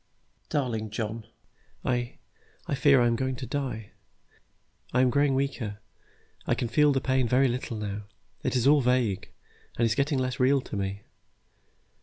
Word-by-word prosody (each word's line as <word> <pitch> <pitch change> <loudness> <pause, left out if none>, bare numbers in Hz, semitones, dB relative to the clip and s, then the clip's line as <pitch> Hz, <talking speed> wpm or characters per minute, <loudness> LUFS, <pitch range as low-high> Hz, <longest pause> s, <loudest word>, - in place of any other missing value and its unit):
"Darling 115 -7 -1
John, 110 +1 -4 0.6
I 120 -1 -1 0.5
I - - -3
fear 140 -1 +5
I 120 - +4
am 120 - +3
really - - -1
going 130 -1 -1
to 130 - -6
die. 125 -6 -4 1.0
I 125 - +4
am 130 -1 +4
growing 140 0 +3
weaker. 130 -6 -2 0.7
I - - +2
can 120 - -2
feel 150 +5 +4
the 135 - +2
pain 130 -1 +1
very 130 +3 +4
little 120 -2 -3
now. 105 -1 -4 0.4
It - - -1
is 125 -1 +2
all 145 +1 +6
vague, 120 -6 +1 0.5
and 115 - +3
is 115 - +2
getting 140 +4 +1
less 130 -1 -1
real 135 +2 +4
to - - -8
me. 100 0 -3
125 Hz, 170 wpm, -27 LUFS, 110-135 Hz, 1.0 s, all